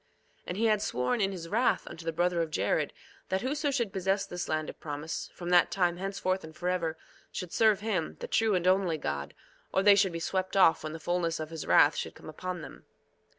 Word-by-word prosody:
2:8 - - -35
And 180 - -4
he 225 - +1
had 215 -2 +3
sworn 125 - 0
in 195 0 +2
his 175 -3 -6
wrath 230 +8 +1
unto 165 - -9
the 165 - 0
brother 175 +1 +1
of 165 - -1
Jared, 155 - 0 0.4
that 190 0 0
whoso 290 +3 -1
should 235 -8 -1
possess 195 +1 0
this 180 0 -5
land 155 -1 -1
of - - -8
promise, 150 +1 -5
from 175 -1 -5
that 175 -1 +6
time 175 -2 +1
henceforth 190 0 -2
and 160 0 -10
forever, 175 -2 -1 0.3
should 180 -2 -6
serve 215 -3 +4
him, 220 +1 -2
the 485 - -5
true 225 - +2
and 180 -1 0
only 185 -3 +3
God, 70 - -4 0.4
or 190 - +2
they 205 0 +8
should 200 -2 +3
be 165 - -4
swept 185 +3 -1
off 165 -5 +5
when 155 0 -4
the 165 - -6
fulness 170 -1 -1
of 155 0 -5
his 160 -2 -6
wrath 145 +1 +6
should - - -4
come - - -11
upon 180 +2 -5
them. - - -11
180 Hz, 230 wpm, -30 LUFS, 165-195 Hz, 0.4 s, they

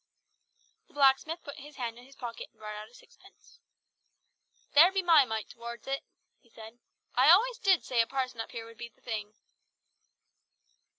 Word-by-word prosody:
The - - -26
blacksmith 285 +4 +3
put 285 +2 -9
his 290 +1 -12
hand 235 -2 -5
in 245 - -15
his 270 +1 -18
pocket 235 -2 -7
and - - -38
brought 215 0 -7
out 210 +1 -8
sixpence. 465 +1 -20 1.1
"There 330 +6 +8
be 385 -1 0
my 325 -5 +6
mite 220 -2 -4
towards 235 0 -9
it," 275 0 -2 0.4
he 235 - -28
said. 225 +1 -13 0.3
"I 260 +4 +5
always 455 +8 +5
did 380 -3 +3
say 245 -2 +2
a 230 - 0
parson 255 -4 -3
up 225 - -7
here 230 -1 -6
would 230 -1 -15
be 235 - -7
the - - -34
thing!" 215 -2 -5
250 Hz, 175 wpm, -30 LUFS, 230-295 Hz, 1.1 s, There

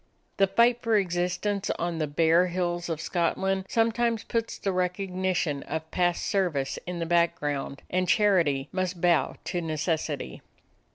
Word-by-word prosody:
The 195 - +4
fight 235 +5 +3
for 225 -2 +2
existence 185 +2 -1
on 170 -1 -2
the 155 - 0
bare 165 +4 +3
hills 175 -1 -2
of 160 -2 -2
Scotland 190 +3 0
sometimes 230 0 +1
puts 230 -1 -2
the 195 - -1
recognition 180 -4 -1
of 160 +2 -5
past 175 -1 +1
service 170 -10 0
in 180 0 -3
the 170 - -2
background, 150 -5 0
and 185 -1 0
charity 170 -10 +3
must 185 -1 -2
bow 175 -1 +2
to 175 -1 -2
necessity. 155 - -2
175 Hz, 140 wpm, -27 LUFS, 165-195 Hz, -, The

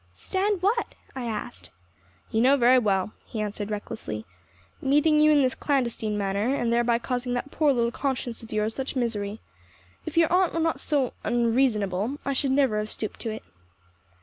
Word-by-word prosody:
"Stand 380 - -1
what?" 455 +4 +1 0.2
I 255 -2 -4
asked. 205 - -5 0.6
"You 220 - +2
know 270 +3 +5
very 250 0 +6
well," 200 -3 0
he 225 - -5
answered 210 0 -3
recklessly. 205 - -5 0.6
"Meeting 295 +3 +4
you 305 - +6
in 295 -2 +5
this 255 0 +2
clandestine 235 -6 -1
manner, 200 +6 0
and 235 -3 0
thereby 235 0 +3
causing 245 0 -2
that 280 +4 -4
poor 300 -2 +3
little 235 -3 +1
conscience 250 -3 -3
of 225 - -12
yours 215 +1 0
such 265 +2 -4
misery. 220 -4 -2 0.7
If - - -5
your 330 0 +4
aunt 365 -2 +3
were - - +1
not 325 0 0
so 280 -5 0
unreasonable, 230 -2 +1
I 275 - 0
should 270 +1 0
never 265 -6 +3
have 215 0 -4
stooped 215 - -5
to 230 - -3
it." 220 0 -6
240 Hz, 175 wpm, -26 LUFS, 215-280 Hz, 0.7 s, very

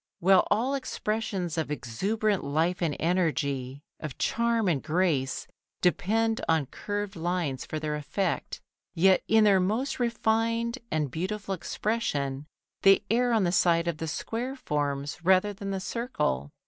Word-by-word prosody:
While 190 +1 +5
all 240 +6 +1
expressions 210 - -2
of 160 - -2
exuberant 195 - -1
life 160 +6 0
and 160 -4 0
energy, 140 -6 0 0.2
of 155 -4 -6
charm 235 -2 +1
and 155 -7 +1
grace 155 -5 0 0.3
depend 220 +5 +1
on 160 -3 +3
curved 205 +8 -4
lines 170 -5 -2
for 155 - -3
their 155 -1 -2
effect, 170 +5 -2 0.4
yet 185 +2 +5
in 220 0 +5
their 200 -2 +5
most 220 +11 -1
refined 230 +1 0
and 150 -4 -1
beautiful 195 +5 -3
expression 150 -9 -2 0.3
they 195 +1 +6
err 245 +1 +3
on 225 -3 +3
the 175 - +1
side 170 -2 +3
of 170 -2 -1
the 160 - -3
square 235 - -3
forms 145 - -2
rather 190 +3 +4
than 200 0 -6
the 195 -1 -2
circle. 185 - -2
185 Hz, 145 wpm, -28 LUFS, 155-220 Hz, 0.4 s, they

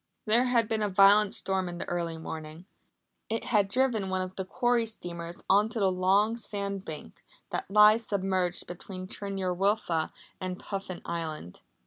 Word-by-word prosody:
There 235 +3 +5
had 235 -3 +2
been 220 -1 -1
a 210 - +1
violent 200 +2 +6
storm 190 -2 -1
in 175 - -6
the - - -5
early 170 -2 -2
morning. 160 +1 -8 0.6
It 225 +1 -1
had 205 -4 +2
driven 225 -3 +1
one 185 0 0
of 185 0 -8
the 190 - -4
quarry 240 +2 +1
steamers 170 -5 -7
on 205 +3 +4
to 225 - -4
the 195 -2 +3
long 195 +5 +2
sand 200 -3 -4
bank 155 -4 -8 0.3
that - - -3
lies 210 +2 +6
submerged 185 -3 0
between 185 +1 -8
Tryn 200 +1 -5
yr 185 -1 0
Wylfa 180 -4 0 0.3
and 185 -1 -4
Puffin 195 -2 -6
Island. 160 - -5
195 Hz, 170 wpm, -29 LUFS, 175-210 Hz, 0.6 s, violent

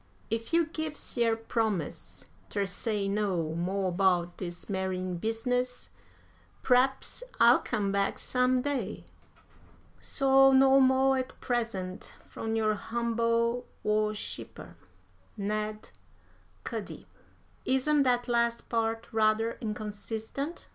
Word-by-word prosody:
If 230 0 -2
you 335 0 +4
gives 315 -1 -5
yer 230 -2 +3
promise 225 -7 -3 0.2
ter 200 - -1
say 200 +1 -2
no 195 -6 0
mo' 185 +3 -1
'bout 175 -1 +2
dis 175 -2 -6
marryin' 185 -2 -2
business, 245 +4 -2 0.7
p'r'aps 260 - +2 0.2
I'll 240 +2 +7
come 205 -4 -1
back 200 0 0
some 250 0 +1
day. 265 -8 -3 0.9
So 270 -1 +4
no 270 0 +6
mo' 265 0 +4
at 260 -1 -3
present, 225 -7 -3
from 225 0 -4
your 215 -1 +2
humble 235 +2 0 0.2
worshipper, 210 0 -2 0.6
"NED 215 +1 -3 0.7
CUDDY." - - -6 0.6
"Isn't 275 +3 +2
that 245 -2 +2
last 235 -1 0
part 225 0 -1
rather 220 +1 +2
inconsistent?" 220 +7 -5
225 Hz, 105 wpm, -29 LUFS, 205-250 Hz, 0.9 s, I'll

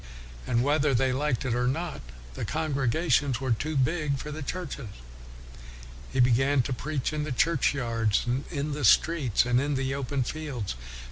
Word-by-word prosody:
And 120 +1 +2
whether 145 -1 +2
they 130 +2 +2
liked 135 -2 -1
it 125 - 0
or 125 +1 +1
not, 165 +6 -2 0.3
the - - -5
congregations 145 -3 +1
were 130 -2 -2
too 150 +7 -1
big 145 +1 +1
for 150 +3 -6
the 155 +1 -6
churches. 145 -4 -5 1.2
He 135 - -2
began 130 +2 +4
to 130 - -2
preach 145 +2 -2
in 150 -1 -1
the 150 - -4
churchyards, 120 -7 +1
and 125 +3 -1
in 145 -1 -3
the 145 0 -3
streets, 135 -1 +4
and 125 +1 +2
in 145 0 0
the 135 0 -1
open 135 0 -1
fields. 135 - -4
135 Hz, 165 wpm, -27 LUFS, 125-150 Hz, 1.2 s, began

